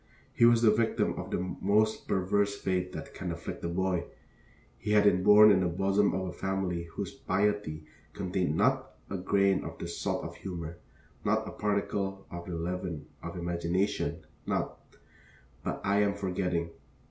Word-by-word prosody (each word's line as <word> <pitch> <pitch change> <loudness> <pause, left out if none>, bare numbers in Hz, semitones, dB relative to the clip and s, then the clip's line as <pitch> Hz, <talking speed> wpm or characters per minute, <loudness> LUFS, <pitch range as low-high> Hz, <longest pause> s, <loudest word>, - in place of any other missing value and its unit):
He 115 - +5
was 120 0 +5
the 110 - +7
victim 110 +1 +1
of - - -6
the - - -1 0.2
most 110 +2 +2
perverse 100 +2 +1
fate 90 -1 -1
that - - -7
can 90 - -4
afflict 85 0 -6
a 85 - -1
boy: 90 0 0 0.7
he 105 - -1
had 105 -1 +6
been 95 -3 +4
born 105 +2 +8
in 95 - +5
the 90 - +2
bosom 95 +3 +2
of 95 0 -1
a 90 - -5
family 95 -3 -2
whose 85 - -5
piety 95 -6 -1 0.3
contained 90 -4 -1
not 130 +5 +1 0.2
a 100 - -1
grain 100 +1 +2
of - - -7
the - - -5
salt - - -2
of - - -7
humor, 85 -3 -6 0.4
not - - +1
a - - -5
particle 100 -1 -1
of 85 0 -7
the 90 - -4
leaven 85 -2 -3 0.2
of - - -6
imagination, 85 -1 -1 0.2
not - - -1 0.8
But - - -2
I 100 +1 +2
am 100 -1 +2
forgetting. 90 -4 -1
95 Hz, 170 wpm, -30 LUFS, 85-100 Hz, 0.8 s, born